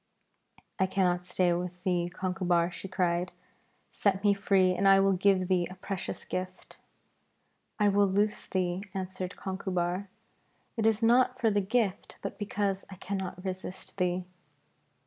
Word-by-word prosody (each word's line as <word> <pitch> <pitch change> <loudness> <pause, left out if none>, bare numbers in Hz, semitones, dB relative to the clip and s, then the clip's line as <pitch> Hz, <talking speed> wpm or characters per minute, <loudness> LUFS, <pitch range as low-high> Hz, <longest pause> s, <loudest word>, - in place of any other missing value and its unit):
'I 190 - +3
cannot 180 -2 +1
stay 180 -1 +2
with 180 +1 -4
thee, 175 -2 +1
Conchubar,' 180 -1 0
she 195 - -7
cried; 180 -1 0 0.6
'set 195 -1 +1
me 205 -1 +5
free, 195 -2 +3
and 195 +2 +2
I 195 0 +7
will 195 0 +4
give 185 0 +3
thee 180 -2 +2
a 185 - -9
precious 190 0 -5
gift.' 185 0 -5 1.0
'I 210 -1 +4
will 200 0 +4
loose 205 +2 0
thee,' 180 -1 -1
answered 185 0 -4
Conchubar. 190 -1 -2 0.7
'It 225 -1 +2
is 225 0 +2
not 250 +2 +4
for 225 -3 +3
the 205 0 +2
gift, 205 -1 -1
but 200 - -5
because 200 -2 -1
I 195 - -9
cannot 190 0 -5
resist 185 0 -6
thee.' 180 0 0
190 Hz, 145 wpm, -29 LUFS, 180-200 Hz, 1.0 s, I